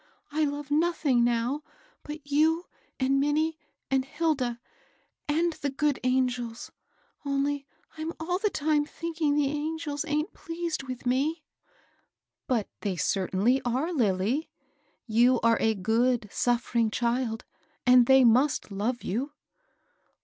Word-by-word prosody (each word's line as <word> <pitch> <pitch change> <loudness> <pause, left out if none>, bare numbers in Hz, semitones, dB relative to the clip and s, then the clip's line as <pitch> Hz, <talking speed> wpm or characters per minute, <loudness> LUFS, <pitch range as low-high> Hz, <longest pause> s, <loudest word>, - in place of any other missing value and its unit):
I 305 +1 +1
love 290 0 -4
nothing 300 -5 +2
now 240 +4 0 0.4
but 300 -1 -8
you 315 +4 +2 0.3
and 270 +1 +2
Minnie 310 +3 +1 0.3
and 265 -1 +3
Hilda 270 -5 -1 0.4
— - - -43
and 330 +3 +2
the 285 - -3
good 285 0 0
angels; 250 -2 -1 0.5
only 280 0 -1 0.3
I'm 320 +1 -3
all 355 +3 -1
the 420 +1 +1
time 300 -3 +1
thinking 320 -1 -2
the 295 -1 +3
angels 300 0 -3
aint 300 +2 -1
pleased 335 -3 -4
with 255 -2 -7
me." 290 +6 0 1.0
But 235 -5 0
they 200 -3 -2
certainly 195 +8 +1
are, 260 +8 -1
Lilly; 225 - +1 0.6
you 240 +2 +4
are 230 0 +4
a 220 0 +2
good, 225 +3 +1
suffering 235 -1 +1
child, 235 0 -1 0.4
and 250 -1 +6
they 265 0 +7
must 250 0 +3
love 225 +5 -2
you." 265 +9 -2
270 Hz, 125 wpm, -28 LUFS, 240-305 Hz, 1.0 s, they